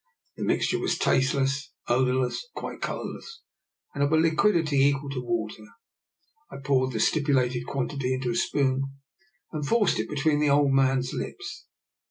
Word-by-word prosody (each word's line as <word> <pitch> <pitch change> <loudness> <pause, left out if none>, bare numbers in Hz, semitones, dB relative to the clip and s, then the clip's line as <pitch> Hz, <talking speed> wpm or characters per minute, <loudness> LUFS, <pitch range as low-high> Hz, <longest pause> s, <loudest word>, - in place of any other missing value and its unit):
The - - -5
mixture - - +1
was - - 0
tasteless, 135 +2 +1
odour 125 +1 +2
less, 130 -1 -1
and - - -27
quite - - -7
colourless, 455 0 -6 0.5
and 140 - 0
of 145 - +1
a 160 - +4
liquidity 165 -1 +2
equal 140 +1 +2
to 130 -2 -3
water. 110 -3 -3 0.9
I - - -9
poured 130 -1 +1
the 110 - -2
stipulated 130 -3 +1
quan 135 -2 -1
tity 140 -3 -3
into 130 -1 -2
a - - -2
spoon 135 +1 +1 0.7
and 155 -2 -4
forced 215 +8 +2
it - - -2
between 150 0 +1
the 150 -1 +2
old 140 0 +4
man's 135 -1 +2
lips. 400 +4 -6
140 Hz, 165 wpm, -26 LUFS, 130-150 Hz, 0.9 s, a